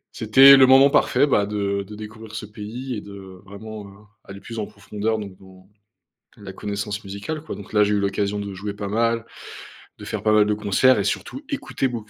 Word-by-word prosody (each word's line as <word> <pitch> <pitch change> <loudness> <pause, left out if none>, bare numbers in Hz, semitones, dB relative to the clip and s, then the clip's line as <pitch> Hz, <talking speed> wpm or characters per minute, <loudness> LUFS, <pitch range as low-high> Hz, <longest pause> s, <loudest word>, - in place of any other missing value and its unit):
c'était 135 +5 +7
le 130 -1 +7
moment 135 +1 +6
parfait, - - +3
bah, 105 -8 +1
de 100 -1 -2
de 105 +2 -10
découvrir 110 +1 -10
ce 110 - -5
pays 110 +5 -7
et 105 - -5
de 95 -2 -12
vraiment, 105 +1 -9
heu, 100 0 -16 0.3
aller 100 0 -11
plus 115 +1 -8
en 105 - -3
profondeur, 110 +2 -4
donc 100 -3 -8
dans 95 0 -18 0.7
la 100 -2 -10
connaissance 100 +2 -5
musicale 100 +11 -6
quoi. - - -7
Donc 100 +1 -11
là, 105 -1 +4
j'ai 105 +1 0
eu 100 - +1
l'occasion 100 +1 -1
de 100 -1 -6
jouer 100 +2 -6
pas 100 -1 -5
mal, 115 +2 0 0.7
de - - -12
faire - - -4
pas 110 - +2
mal 105 -1 +5
de 105 - 0
concerts 105 +4 +3
et 100 - -1
surtout 270 - -3
écouter 265 - -2
beaucoup 115 -4 -6
105 Hz, 215 wpm, -22 LUFS, 100-115 Hz, 0.7 s, c'était